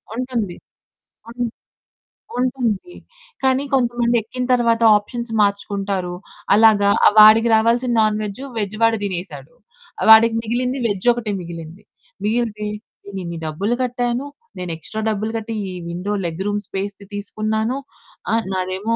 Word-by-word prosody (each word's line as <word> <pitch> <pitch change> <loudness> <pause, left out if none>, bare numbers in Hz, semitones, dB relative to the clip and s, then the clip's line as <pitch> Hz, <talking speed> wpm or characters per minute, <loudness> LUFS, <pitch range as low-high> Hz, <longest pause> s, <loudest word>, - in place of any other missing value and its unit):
ఉంటుంది. 235 -7 -3 0.7
అన్ 245 +1 -4 1.0
ఉంటుంది. 250 - -1 0.5
కానీ, 265 +1 +2
కొంతమంది 240 -2 +2
ఎక్కిన 250 +3 -5
తరువాత 235 -1 +2 0.2
ఆప్షన్స్ 235 +3 -6
మార్చుకుంటారు. 200 -2 -1 0.4
అలాగా 210 -2 +5 0.2
ఆ - - +8
వాడికి 220 +2 +8
రావాల్సిన 235 +3 +2
నాన్ 215 -1 +2
వెజ్జు, 210 +6 -6
వెజ్ 210 0 -2
వాడు 225 0 +4
తినేసాడు. 190 - -5 0.6
వాడికి 225 +1 +8
మిగిలింది 250 +4 -1
వేజ్జొకటే 230 +2 +1
మిగిలింది. 170 +2 -9 0.4
మిగిలితే 215 -1 -1 0.4
"నేను 200 -1 -7
ఇన్ని 170 -1 -5
డబ్బులు 195 +10 -1
కట్టాను, 245 +1 -1 0.3
నేను 180 -2 -4
ఎక్స్‌ట్రా 215 +7 -6
డబ్బులు 215 +1 -2
కట్టి 225 +1 -5 0.2
ఈ - - -5 0.2
విండో 180 +4 -3
లెగ్ 170 +2 -4
రూమ్ 205 0 0
స్పేస్‌ది 200 +1 -5
తీసుకున్నాను. 215 +3 -2 0.6
ఆ! - - +3 0.2
నాదేమో 190 +4 -1
215 Hz, 125 wpm, -20 LUFS, 200-240 Hz, 1.0 s, ఆ